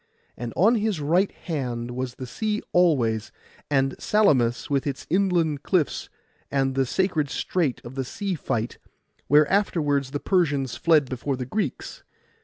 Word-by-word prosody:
And 120 -1 -5
on 215 +7 +5
his 215 -6 0
right 170 +7 +2
hand 125 -7 -4
was 125 0 -4
the 130 - -6
sea 215 - -2
always, 125 -12 +2 0.4
and 135 -2 +1
Salamis, 135 - +2
with 140 0 0
its 135 -2 -4
island 175 -6 +2
cliffs, 175 -4 0 0.4
and 135 -1 +1
the 135 -1 +1
sacred 170 -3 0
strait 160 -3 -1
of 120 - -9
the 135 0 -2
sea 195 +9 -3
fight, 120 -7 -3 0.5
where 150 +2 +5
afterwards 150 -9 +1
the 145 - -3
Persians 145 - +1
fled 155 -5 +3
before 130 +2 -2
the 125 - -4
Greeks. 210 - -3
145 Hz, 150 wpm, -25 LUFS, 130-180 Hz, 0.5 s, on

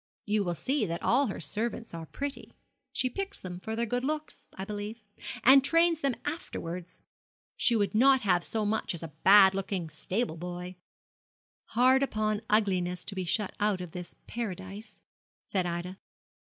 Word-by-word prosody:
You 210 0 +1
will 175 -2 -2
see 270 - 0
that 170 0 -4
all 270 +3 +3
her 200 - -4
servants 225 +7 -3
are 165 -1 -6
pretty. 280 - -6 0.4
She 255 - +1
picks 390 +10 -4
them 180 -1 -7
for 220 +4 -4
their 235 +1 0
good 245 +2 -1
looks, 305 +2 -3
I 190 - -5
believe, 210 +2 -6 0.4
and 265 +2 +8
trains 330 +2 +4
them 275 -5 0
afterwards. 180 - -5 0.5
She 235 - +3
would 205 -1 +1
not 265 +4 +5
have 180 -4 +2
so 220 -2 -1
much 210 -3 -1
as 170 - -4
a 165 - -5
bad 195 -1 +8
looking 190 -4 -3
stable 180 +4 -2
boy.' 180 +1 -6 0.9
'Hard 255 +3 +4
upon 215 -5 0
ugliness 185 -4 +1
to - - -4
be 190 -2 -3
shut 195 +3 0
out 205 -2 +2
of 180 -2 -7
this 180 0 -8
paradise,' 205 -2 -6 0.4
said 185 -3 -1
Ida. 175 +2 -4
210 Hz, 165 wpm, -29 LUFS, 180-245 Hz, 0.9 s, and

